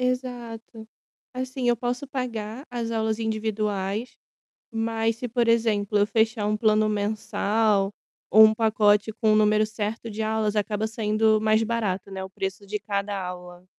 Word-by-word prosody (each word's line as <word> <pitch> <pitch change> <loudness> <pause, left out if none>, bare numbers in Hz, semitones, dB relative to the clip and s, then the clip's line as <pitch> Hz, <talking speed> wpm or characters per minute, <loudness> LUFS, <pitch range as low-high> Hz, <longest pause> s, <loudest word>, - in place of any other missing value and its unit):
Exato. 240 -3 -4 0.5
Assim, 255 -1 -2
eu 240 - +2
posso 245 +3 -3
pagar 245 -1 -4
as 235 -2 -3
aulas 220 -1 -1
individuais, 215 -1 -2 0.5
mas, 225 0 -1
se 245 - -4
por 235 0 +1
exemplo, 215 -3 +2
eu 205 - +3
fechar 220 -1 +1
um 210 - +1
plano 215 0 +3
mensal 210 -1 0 0.4
ou 220 +1 +9
um 215 - +4
pacote 215 -1 +3
com 220 -1 +2
o - - +4
número 215 0 +4
certo 215 +1 -4
de 220 +1 -3
aulas, 215 -1 0
acaba 210 +1 0
saindo 215 0 +1
mais 220 0 +3
barato, 215 -4 -2
né, 190 -1 -5
o 190 - -7
preço 195 +1 -5
de 210 +1 -3
cada 200 0 -3
aula. 180 0 -8
220 Hz, 155 wpm, -25 LUFS, 210-230 Hz, 0.5 s, ou